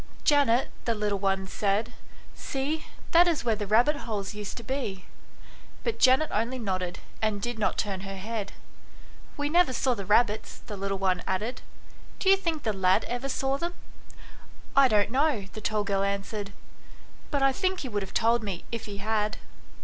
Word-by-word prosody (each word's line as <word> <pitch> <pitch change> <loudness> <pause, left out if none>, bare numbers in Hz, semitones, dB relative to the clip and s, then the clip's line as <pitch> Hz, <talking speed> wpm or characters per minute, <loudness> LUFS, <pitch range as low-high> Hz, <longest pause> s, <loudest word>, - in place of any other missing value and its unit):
" - - -24
Janet," 275 -4 +4
the 230 - +1
little 210 -2 -1
one 195 -1 +1
said, 200 +2 0 0.2
" - - -22
see, 295 +4 -3 0.2
that 345 +1 +7
is 315 -8 0
where 225 -2 +3
the 205 -1 -4
rabbit 240 +8 +4
holes 215 -6 -4
used 210 -1 -6
to 235 - -6
be 230 -9 -3 0.4
"; - - -23
but 470 - -2
Janet 265 +4 +5
only 230 +5 0
nodded, 185 -6 -2 0.2
and 215 -2 +1
did 240 +2 -4
not 210 - +1
turn 200 -3 -1
her 195 0 -6
head. 210 +1 -4 0.4
" - - -22
We 290 0 0
never 330 -3 +4
saw 255 +1 +2
the 200 -5 -6
rabbits," 215 0 +2
the 210 - -6
little 195 0 -2
one 185 -2 +1
added. 210 +7 -2 0.3
" - - -23
Do 385 - +4
you - - +9
think 335 -5 -2
the 215 - 0
lad 190 +2 +3
ever 245 +3 -3
saw 270 +1 0
them 345 +1 -3 0.4
?" - - -19
" - - -23
I 275 -1 +7
don't 210 -2 +3
know," 270 -6 +2
the 215 - -7
tall 210 0 0
girl 200 -1 0
answered; 200 +1 -2 0.4
" - - -24
but 285 -3 +1
I 270 - +5
think 375 +3 0
he 270 - -4
would 205 -2 -1
have 195 - -6
told 230 +1 +3
me 195 -5 -5
if 230 -1 -4
he 205 -1 -6
had." 210 +1 0
220 Hz, 205 wpm, -28 LUFS, 200-270 Hz, 0.4 s, you